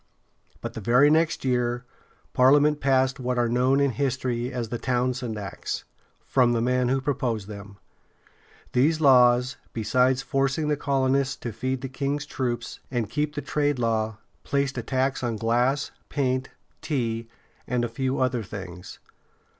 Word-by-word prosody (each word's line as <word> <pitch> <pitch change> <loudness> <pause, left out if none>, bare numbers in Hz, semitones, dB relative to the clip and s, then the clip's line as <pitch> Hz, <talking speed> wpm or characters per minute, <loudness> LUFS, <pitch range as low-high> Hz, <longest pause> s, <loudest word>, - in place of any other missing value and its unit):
But - - -5
the 110 - -6
very 125 +8 +5
next 160 -2 +2
year 125 -1 0 0.5
Parliament 145 +3 +5
passed 130 -1 +2
what 125 -1 -1
are 120 -1 +2
known 125 +3 +2
in 140 -1 +3
history 130 -2 -1
as 120 -4 -3
the 120 - -3
"Townshend 125 -1 -1
Acts," 100 -3 -5 0.4
from 125 -2 +3
the 115 - +1
man 125 +1 +1
who 135 +1 +2
proposed 125 -7 -2
them. 100 -1 -9 1.0
These 150 +6 +3
laws, 125 -3 +5 0.2
besides 125 +4 +2
forcing 135 +3 0
the 150 - +2
colonists 135 -1 +1
to 120 - -6
feed 130 +4 -2
the 135 - -3
king's 140 +2 -2
troops 120 -5 -3
and 120 -4 -2
keep 150 0 -1
the 145 - -3
trade 145 -2 0
law, 110 -2 0 0.3
placed 140 -1 0
a - - -2
tax 130 +3 -1
on 120 -2 -1
glass, 120 +6 +1 0.2
paint, 130 -2 0 0.3
tea, 115 -7 -2 0.4
and 125 -1 0
a - - -1
few 130 +3 -2
other 130 -2 +1
things. 95 -3 -8
125 Hz, 155 wpm, -25 LUFS, 120-135 Hz, 1.0 s, very